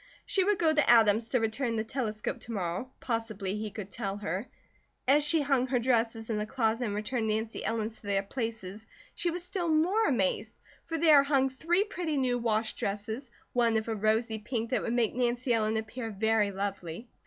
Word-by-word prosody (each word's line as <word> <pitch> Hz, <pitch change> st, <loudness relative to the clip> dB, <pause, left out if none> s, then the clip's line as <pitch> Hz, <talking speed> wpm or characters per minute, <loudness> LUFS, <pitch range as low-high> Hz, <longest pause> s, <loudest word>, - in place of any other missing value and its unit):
She 385 Hz, -, +2 dB
would 410 Hz, +1 st, +2 dB
go 320 Hz, -2 st, +3 dB
to 300 Hz, -2 st, +2 dB
Adam's 225 Hz, -1 st, +5 dB
to 250 Hz, -, +2 dB
return 230 Hz, +2 st, -1 dB
the 220 Hz, -, 0 dB
telescope 220 Hz, -3 st, -3 dB
to 235 Hz, -, -9 dB
morrow, 190 Hz, +3 st, -3 dB
possibly 220 Hz, -5 st, -3 dB
he 215 Hz, 0 st, -3 dB
could 200 Hz, -1 st, -8 dB
tell 200 Hz, -2 st, -3 dB
her. 200 Hz, +3 st, -3 dB, 0.6 s
As 290 Hz, +3 st, +5 dB
she 305 Hz, +1 st, +3 dB
hung 275 Hz, -3 st, +2 dB
her 260 Hz, -, +1 dB
dresses 230 Hz, -2 st, +1 dB
in 215 Hz, -, 0 dB
the 210 Hz, -, -2 dB
closet 230 Hz, -1 st, 0 dB
and 205 Hz, -2 st, -2 dB
returned 220 Hz, +2 st, -1 dB
Nancy 220 Hz, +1 st, -2 dB
Ellen's 225 Hz, 0 st, -2 dB
to -, -, -13 dB
their 200 Hz, -1 st, +1 dB
places 220 Hz, -2 st, -5 dB, 0.3 s
she 350 Hz, -, -1 dB
was 345 Hz, +1 st, -4 dB
still 360 Hz, -1 st, -3 dB
more 355 Hz, +8 st, +3 dB
amazed, 215 Hz, -1 st, 0 dB, 0.3 s
for 330 Hz, -, -2 dB
there 310 Hz, -3 st, +7 dB
hung 275 Hz, -2 st, +2 dB
three 340 Hz, +8 st, +1 dB
pretty 350 Hz, -7 st, -3 dB
new 250 Hz, -2 st, +1 dB
wash 220 Hz, -1 st, 0 dB
dresses, 220 Hz, +6 st, -4 dB, 0.2 s
one 235 Hz, -2 st, +3 dB
of 220 Hz, -, -2 dB
a 225 Hz, -, -1 dB
rosy 220 Hz, +2 st, +1 dB
pink 230 Hz, +2 st, -3 dB
that 255 Hz, -, +1 dB
would 230 Hz, -, -2 dB
make 235 Hz, -3 st, +1 dB
Nancy 245 Hz, 0 st, 0 dB
Ellen 220 Hz, -1 st, +1 dB
appear 225 Hz, +1 st, -4 dB
very 220 Hz, 0 st, +2 dB
lovely. 195 Hz, 0 st, -4 dB
230 Hz, 200 wpm, -30 LUFS, 215-265 Hz, 0.6 s, there